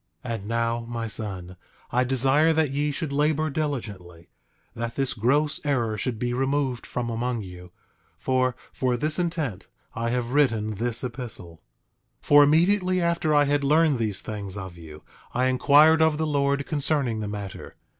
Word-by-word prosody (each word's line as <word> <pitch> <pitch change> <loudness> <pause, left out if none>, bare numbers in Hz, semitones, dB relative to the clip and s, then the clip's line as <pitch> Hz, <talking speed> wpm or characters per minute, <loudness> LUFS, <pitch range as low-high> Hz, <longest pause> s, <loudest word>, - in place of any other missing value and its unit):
8:6 120 - -2
And 105 -3 -6
now, 115 +1 0
my 115 -1 -3
son, 95 -5 -5 0.3
I 125 +1 +2
desire 135 +5 +3
that 160 -3 +1
ye 145 +2 0
should 145 0 -3
labor 155 +1 +1
diligently, 100 - -5 0.5
that 115 0 -4
this 135 -2 0
gross 145 +7 +1
error 120 -7 0
should 110 +3 -3
be 120 +2 -2
removed 135 -1 -1
from 120 -1 -3
among 120 0 -2
you; 90 -1 -11 0.5
for, 130 -1 0 0.2
for 125 -2 0
this 155 +6 -1
intent 160 - -2 0.3
I 115 0 -2
have 120 0 -2
written 115 -7 +2
this 115 +4 -2
epistle. 115 - -6 0.6
8:7 - - -22
For 145 0 +7
immediately 185 +5 +3
after 170 -3 +1
I 145 - +6
had 145 0 +1
learned 150 -1 +3
these 105 -4 -1
things 100 -2 -5
of 95 -3 -7
you 80 -3 -12 0.3
I 125 - +2
inquired 145 +5 +5
of 160 -1 +3
the 160 - 0
Lord 140 -1 0
concerning 145 -6 0
the 105 - -3
matter. 100 -2 -7
130 Hz, 165 wpm, -25 LUFS, 110-145 Hz, 0.6 s, For